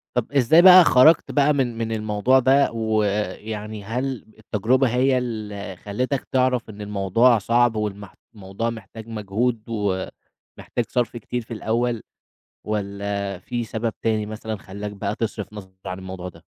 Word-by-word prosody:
طَب 125 Hz, +1 st, -1 dB
إزاي 145 Hz, +4 st, +5 dB
بقى 185 Hz, 0 st, +10 dB
خرجت 155 Hz, +3 st, +5 dB
بقى 145 Hz, 0 st, +3 dB
من 125 Hz, -5 st, -1 dB
من 115 Hz, -1 st, -2 dB
الموضوع 110 Hz, +4 st, +2 dB
ده، 135 Hz, +2 st, +4 dB
ويعني 105 Hz, -1 st, -2 dB
هل 125 Hz, +4 st, -3 dB
التجربة 120 Hz, +5 st, +1 dB
هي 130 Hz, +2 st, +2 dB
اللي 105 Hz, -5 st, -5 dB
خلّتك 125 Hz, +9 st, -3 dB
تعرف 130 Hz, -3 st, +1 dB
إن 105 Hz, -1 st, -9 dB
الموضوع 105 Hz, +4 st, +3 dB
صعب، 120 Hz, +3 st, +2 dB
والمحت 105 Hz, -2 st, -4 dB, 0.2 s
الموضوع 100 Hz, +3 st, -4 dB
محتاج 115 Hz, -1 st, -9 dB
مجهود، 110 Hz, +2 st, -2 dB
و 100 Hz, -4 st, -1 dB, 0.5 s
محتاج 120 Hz, -, -3 dB
صرف 120 Hz, -1 st, -1 dB
كتير 120 Hz, +2 st, -4 dB
في 115 Hz, +1 st, -9 dB
الأول، 115 Hz, +1 st, -1 dB, 0.7 s
والّا 100 Hz, -2 st, -3 dB
في 120 Hz, +5 st, -4 dB
سبب 110 Hz, 0 st, -3 dB
تاني 110 Hz, -2 st, 0 dB
مثلًا 110 Hz, +1 st, -5 dB
خلاك 100 Hz, +2 st, -7 dB
بقى 100 Hz, +1 st, -3 dB
تصرف 105 Hz, -3 st, -4 dB
نظر 95 Hz, -3 st, -10 dB
عن 95 Hz, +1 st, -5 dB
الموضوع 95 Hz, -1 st, -7 dB
ده؟ -, -, -17 dB
110 Hz, 150 wpm, -23 LUFS, 105-125 Hz, 0.7 s, بقى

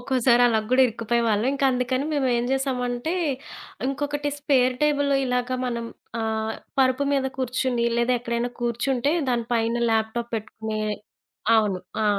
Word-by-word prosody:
ఒక్కోసారి 245 Hz, -1 st, +3 dB
అలా 225 Hz, -2 st, +3 dB
కూడా 260 Hz, +1 st, +5 dB
ఇరుక్కుపోయేవాళ్ళం. 230 Hz, -1 st, 0 dB
ఇంకందుకని 260 Hz, -1 st, +1 dB
మేము 280 Hz, -3 st, +1 dB
ఏం 235 Hz, -, 0 dB
చేసామంటే 260 Hz, +1 st, -1 dB, 0.7 s
ఇంకొకటి 290 Hz, +1 st, -2 dB
స్పేర్‌‌‌‌‌‌‌‌‌‌‌‌‌‌టేబుల్ 280 Hz, +1 st, +2 dB, 0.2 s
ఇలాగ 250 Hz, 0 st, 0 dB, 0.2 s
మనం 235 Hz, -1 st, -3 dB, 0.3 s
ఆహ్, 220 Hz, 0 st, -1 dB, 0.3 s
పరుపు 260 Hz, +1 st, +3 dB
మీద 270 Hz, -1 st, +1 dB
కూర్చొని 255 Hz, -1 st, 0 dB
లేదా 240 Hz, +1 st, +2 dB
ఎక్కడైనా 235 Hz, 0 st, -2 dB
కూర్చుంటే 240 Hz, +3 st, 0 dB, 0.2 s
దాని 240 Hz, -2 st, +1 dB
పైన 230 Hz, 0 st, +1 dB, 0.2 s
ల్యాప్‌టాప్ 225 Hz, +2 st, -1 dB
పెట్టుకునే 220 Hz, 0 st, -4 dB, 0.8 s
అవును. 205 Hz, -4 st, +2 dB, 0.2 s
ఆ! -, -, +1 dB
245 Hz, 125 wpm, -24 LUFS, 235-265 Hz, 0.8 s, కూడా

